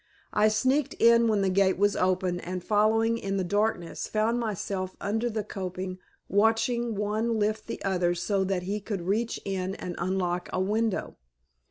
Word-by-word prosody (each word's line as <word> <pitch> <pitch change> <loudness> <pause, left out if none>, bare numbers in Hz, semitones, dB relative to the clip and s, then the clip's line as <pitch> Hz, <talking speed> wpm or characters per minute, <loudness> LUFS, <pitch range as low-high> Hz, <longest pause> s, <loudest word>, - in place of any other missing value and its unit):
I 210 +1 +4
sneaked 255 +6 +1
in 235 0 +5
when 210 -3 +2
the 190 - +2
gate 190 -1 +3
was 205 +1 +2
opened 185 -1 0
and 180 0 -4
following 220 +3 +2
in 195 -1 -2
the 190 - 0
darkness 205 -2 -1
found 220 +3 +1
myself 195 -4 -3
under 225 +4 -1
the 215 -2 -2
coping 185 -2 -5 0.3
watching 225 +3 +2
one 215 +3 0
lift 215 +1 -1
the - - -6
other 180 -2 +1
so 190 +3 0
that 190 -2 -1
he 200 +3 -2
could 200 -3 -4
reach 220 +6 -1
in 190 -1 -2
and 180 - -5
unlock 180 -1 -1
a - - -1
window. 210 +2 -1
205 Hz, 170 wpm, -27 LUFS, 185-220 Hz, 0.3 s, in